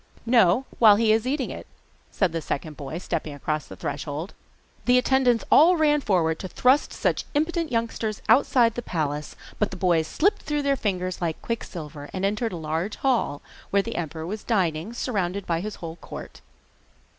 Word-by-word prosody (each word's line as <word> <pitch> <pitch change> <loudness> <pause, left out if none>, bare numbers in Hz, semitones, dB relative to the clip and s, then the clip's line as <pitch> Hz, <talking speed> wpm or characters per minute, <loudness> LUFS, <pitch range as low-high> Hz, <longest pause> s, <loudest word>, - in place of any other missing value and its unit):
'No, 235 0 +4
while 215 -3 +8
he 220 +1 +3
is 220 +2 +2
eating 270 0 -1
it,' - - -8 0.4
said 190 -4 +1
the 165 0 -3
second 150 +1 -4
boy, 145 +2 -6
stepping 160 -4 -3
across 150 +1 -3
the - - -9
threshold. 145 +5 -5 0.5
The 250 0 +5
attendants 250 -2 +3
all 340 +4 +7
ran 295 -2 +3
forward 165 -8 +1
to 185 - -5
thrust 255 +9 +3
such - - -1
impudent 330 +2 0
youngsters 230 -2 -2
outside 245 -4 +4
the 240 - -4
palace, 150 -7 -3 0.2
but 210 - +2
the 190 - -7
boys 170 -3 +2
slipped 395 - +1
through 295 -1 -2
their 280 -1 +2
fingers 185 -6 -2
like 165 -2 -2
quicksilver, 155 -10 -5
and 190 +1 -1
entered 210 +3 0
a - - -4
large 160 +6 -2
hall, 240 - 0 0.3
where 200 +1 +2
the 230 - -5
emperor 160 -1 -4
was 210 +5 -5
dining, 180 -4 0
surrounded 200 -6 -2
by 165 -1 0
his 210 +3 -5
whole 165 -1 -7
court. - - -10
200 Hz, 180 wpm, -25 LUFS, 165-245 Hz, 0.5 s, while